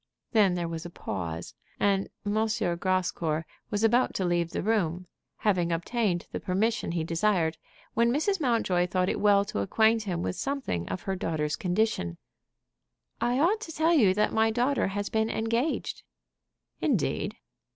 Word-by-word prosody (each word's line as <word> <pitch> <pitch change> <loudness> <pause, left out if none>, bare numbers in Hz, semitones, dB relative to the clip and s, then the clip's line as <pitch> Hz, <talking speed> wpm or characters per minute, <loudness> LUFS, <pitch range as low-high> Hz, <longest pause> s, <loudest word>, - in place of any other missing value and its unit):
Then 205 -6 +4
there 175 -1 -2
was 165 -1 -5
a 175 - -7
pause, 85 - -5 0.3
and 195 -1 +2 0.2
M. 205 - 0 0.4
Grascour 170 -4 0 0.2
was 205 +1 -1
about 240 +3 +3
to 190 - 0
leave 175 -1 +1
the - - -3
room, 185 -5 0 0.3
having 180 -5 +1
obtained 175 +1 0
the - - -3
permission 205 0 0
he 165 -2 0
desired, 165 -1 +1 0.3
when 235 +1 +3
Mrs. 330 +7 +1
Mountjoy 220 -9 +2
thought 185 0 +1
it - - -1
well 200 -1 +4
to 150 - -3
acquaint 220 - +3
him 180 -5 -3
with - - -2
something 270 - -2
of 90 - -4
her 195 - -2
daughter's 155 -4 -1
condition. 180 - 0 1.0
"I 245 +1 +2
ought 370 +10 +2
to 325 - -6
tell 320 +2 +2
you 210 - +5
that 210 +1 +1
my 220 0 +3
daughter 245 +5 +1
has 205 +1 -3
been 220 0 +1
engaged." 230 +8 -1 0.8
"Indeed!" - - 0
195 Hz, 160 wpm, -28 LUFS, 170-225 Hz, 1.0 s, you